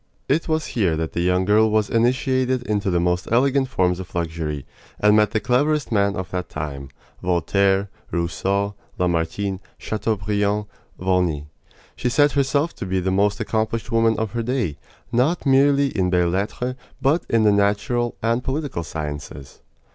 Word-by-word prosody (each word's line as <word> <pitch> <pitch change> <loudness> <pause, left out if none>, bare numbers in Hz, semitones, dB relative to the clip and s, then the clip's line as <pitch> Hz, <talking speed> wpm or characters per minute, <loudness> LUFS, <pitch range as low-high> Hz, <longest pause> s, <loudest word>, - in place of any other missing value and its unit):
It 150 +5 +1
was 155 -1 +1
here 90 -9 +1
that 80 0 -3
the 85 - -1
young 90 +1 +2
girl 110 +2 +4
was 105 -1 +2
initiated 130 +2 +1
into 105 -4 -1
the 90 -1 +2
most 90 +1 0
elegant 135 +3 +3
forms 90 -6 +1
of 95 -1 -9
luxury, 80 -4 -3 0.3
and 105 0 +5
met 105 0 +4
the 110 - 0
cleverest 145 +5 +1
men 100 -2 +2
of 95 -1 -5
that 90 -1 -3
time 70 -3 -5 0.3
Voltaire, 95 +3 +2 0.2
Rousseau, 95 +4 -1 0.2
Lamartine, 90 +3 -1 0.2
Chateaubriand, 105 -1 -1 0.3
Volney. 90 -6 0 0.5
She 125 - -1
set 145 +4 +4
herself 140 +3 +1
to - - -5
be 95 0 0
the 95 +1 -1
most 100 +2 +2
accomplished 110 +1 -2
woman 115 -1 +3
of 110 -2 -2
her 120 - -2
day, 115 - -2 0.3
not 135 +9 +1
merely 140 +1 +4
in 95 -3 +1
belles 90 -1 +2
lettres, 110 +6 -2 0.3
but 155 +5 +2
in 115 -1 +3
the 105 - +5
natural 105 +4 +1
and 115 +2 +1
political 135 - -2
sciences. 75 -4 -7
105 Hz, 160 wpm, -22 LUFS, 90-125 Hz, 0.5 s, and